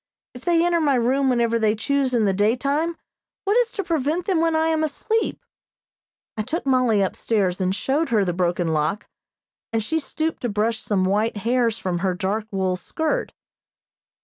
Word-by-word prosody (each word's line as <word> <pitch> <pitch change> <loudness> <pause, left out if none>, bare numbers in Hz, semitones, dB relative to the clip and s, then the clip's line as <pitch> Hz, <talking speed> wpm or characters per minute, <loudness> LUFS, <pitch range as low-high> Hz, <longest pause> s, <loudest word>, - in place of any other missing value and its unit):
If 245 0 -11
they 340 -1 +3
enter 345 -1 +2
my 285 -3 +3
room 260 +3 +2
whenever 235 -2 +2
they 215 -1 +2
choose 270 +4 0
in 225 -3 +3
the 195 - +2
daytime, 275 - +1 0.5
what 410 +2 +1
is - - +3
to 400 - -3
prevent 325 +1 -1
them 370 -5 +1
when 330 -1 +2
I 320 0 +2
am 315 -1 +1
asleep? 435 +9 -1 0.9
I 215 - -2
took 315 +10 -3
Mollie 250 -6 +3
upstairs 195 -1 0
and 185 +1 +1
showed 280 - 0
her 215 -4 +2
the 175 - -1
broken 175 -1 0
lock, 160 +6 0 0.7
and 225 -1 0
she 320 +8 0
stooped 315 +2 -3
to 245 - -1
brush 220 +2 0
some 190 -3 0
white 210 +3 +1
hairs 230 +1 +1
from 180 -2 -2
her 185 0 0
dark 205 +4 -2
wool 190 -3 0
skirt. 320 - -2
235 Hz, 180 wpm, -23 LUFS, 205-315 Hz, 0.9 s, they